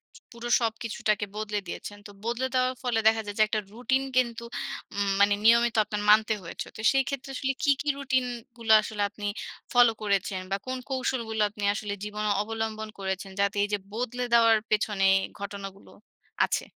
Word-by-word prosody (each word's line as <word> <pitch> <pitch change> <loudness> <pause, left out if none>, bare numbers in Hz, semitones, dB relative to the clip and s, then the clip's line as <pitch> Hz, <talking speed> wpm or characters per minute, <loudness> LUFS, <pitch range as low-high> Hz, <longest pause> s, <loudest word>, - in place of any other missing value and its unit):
ছু - - -15
পুরো 235 0 -7
সবকিছুটাকে 220 -2 -1
বদলে 210 -1 -2
দিয়েছেন। 205 +3 -7
তো - - -12
বদলে 240 +2 -1
দেওয়ার 255 0 +2
ফলে 240 -3 +1
দেখা 220 0 +4
যায় 205 0 -6
যে 215 - +6
একটা 215 0 0
রুটিন 260 +4 0
কিন্তু 235 -2 +1 0.5
উম 200 -1 0
মানে 205 0 +6
নিয়মিত 235 0 +5
আপনার 210 -1 -4
মানতে 215 +1 +6
হয়েছে। 165 - -6
তো 215 - -7
সেইক্ষেত্রে 270 0 -1
আসলে 270 0 -1
কী, 285 - +5
কী 295 - -8
রুটিনগুলা 245 -4 0
আসলে 210 -2 -4
আপনি 205 0 -8 0.5
ফলো 245 -1 +7
করেছেন? 200 -2 0
বা - - +2
কোন 260 0 -2
কৌশলগুলো 235 -4 -1
আপনি 205 0 -8
আসলে 210 -1 -4
জীবনে 210 0 -2
অবলম্বন 220 0 -3
করেছেন? 190 0 -3
যাতে 200 0 +1
এইযে 205 0 0 0.2
বদলে 245 +1 -2
দেওয়ার 230 -1 +6
পেছনে 210 -2 +1 0.3
ঘটনাগুলো 200 -1 -7 0.5
আছে? - - -2
220 Hz, 165 wpm, -27 LUFS, 205-245 Hz, 0.5 s, ফলো